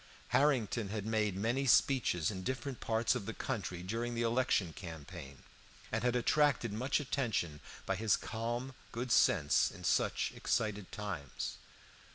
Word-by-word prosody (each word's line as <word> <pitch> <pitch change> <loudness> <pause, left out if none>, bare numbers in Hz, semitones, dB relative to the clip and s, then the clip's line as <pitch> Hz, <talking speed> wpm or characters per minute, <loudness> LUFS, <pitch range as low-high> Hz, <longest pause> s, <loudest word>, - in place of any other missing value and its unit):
Harrington 120 -7 +2
had 105 -1 -3
made 110 -3 +1
many 120 +7 0
speeches 115 - +3
in 95 -2 -5
different 130 +4 -3
parts 115 +1 +1
of 125 -6 -4
the 115 - -4
country 95 -8 -3
during 115 +5 -2
the 115 - 0
election 115 -7 +1
campaign, 80 -5 -9 0.5
and 110 +1 -1
had 125 0 +2
attracted 125 -2 +2
much 130 +7 +1
attention 110 - -1 0.3
by 95 - 0
his 110 +2 +2
calm 120 +3 -3 0.2
good 120 +1 -3
sense 75 -10 +4
in - - -11
such - - +1
excited 105 -3 -1
times. 100 - -4
110 Hz, 145 wpm, -34 LUFS, 95-125 Hz, 0.5 s, sense